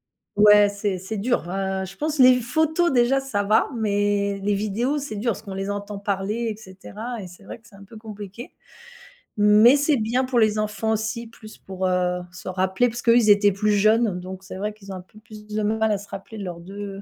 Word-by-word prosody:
hem 205 - -3
ouais, 210 0 +7
c'est 200 -1 -2
c'est 190 +4 -6
dur, 215 -4 -1
hein, 190 0 -2
je 195 +1 -11
pense, 305 0 -2
les 255 -1 +7
photos 315 +7 +1
déjà, 255 +1 +3
ça 205 -7 -2
va, 215 +2 +2
mais 205 -2 0
les 205 0 +1
vidéos, 215 +8 -1
c'est 280 -7 -5
dur 230 +3 0
parce - - -6
qu'on 200 -3 -8
les 195 +1 -4
entend 205 0 -5
parler 200 +3 -2
et 215 - -4
cetera 215 +3 -8
et 185 - -8
c'est 175 0 -15
vrai - - -9
que 215 - -22
c'est 200 - -18
un 195 - -14
peu 210 +3 -13
compliqué. 215 +1 -9 0.9
Mais 210 +5 +6
c'est 290 0 +2
bien 235 +4 0
pour 255 -2 +1
les 215 -1 +2
enfants 215 +1 -2
aussi, 220 +2 -2
plus 220 -1 -14
pour, 190 -1 -4
heu, 180 0 0
se 180 - -12
rappeler 190 +6 +1
parce 240 +2 -6
qu'eux, 230 0 +4
ils 220 -3 +3
étaient 205 0 +5
plus 210 +2 0
jeunes. 215 -1 +2
Donc 185 +1 -9
c'est 185 - -9
vrai 210 +2 -3
qu'ils 200 -2 -12
ont 190 - -5
un 185 - -7
peu 205 +4 -19
plus 215 -1 -14
de 215 0 -3
mal 220 +1 +1
à 205 - +1
se 200 +1 -12
rappeler 215 +3 -9
de 200 - -6
leurs 175 -2 -6
2 195 +2 -8
210 Hz, 235 wpm, -23 LUFS, 195-230 Hz, 0.9 s, ouais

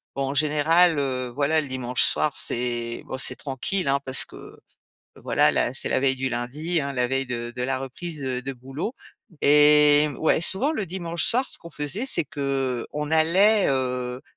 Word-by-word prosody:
bon, 135 -1 -2
en - - -3
général, 155 +3 +3
heu, 130 -3 -2
voilà, 140 +5 0
le 150 - -3
dimanche 125 -2 0
soir, 155 - +3
c'est 120 -1 -1
bon, 130 - -6
c'est 130 - +3
tranquille, 145 +6 -3
hein, 140 0 +1
parce 130 0 +5
que - - -13 0.7
voilà, - - +2
là, - - -1
c'est - - +2
la - - +1
veille 135 0 +1
du 130 0 -3
lundi, 145 +8 -3
hein, 140 -1 -5
la 125 -1 0
veille 135 +1 -2
de 120 -1 -5
de 125 - -5
la 130 +1 -2
reprise 150 +5 -8
de 130 -2 -4
de 135 +2 -6
boulot. 135 - -6 0.5
Et 150 0 +5
ouais, 160 0 +1
souvent 235 - +4
le 215 -11 -4
dimanche 170 -1 -4
soir, 255 +3 +2
ce - - -3
qu'on 170 - -12
faisait, 160 - -4
c'est 265 - +4
qu'on 140 +1 -4
allait, 190 +7 +3
heu, 125 -1 -3
140 Hz, 190 wpm, -23 LUFS, 130-160 Hz, 0.7 s, parce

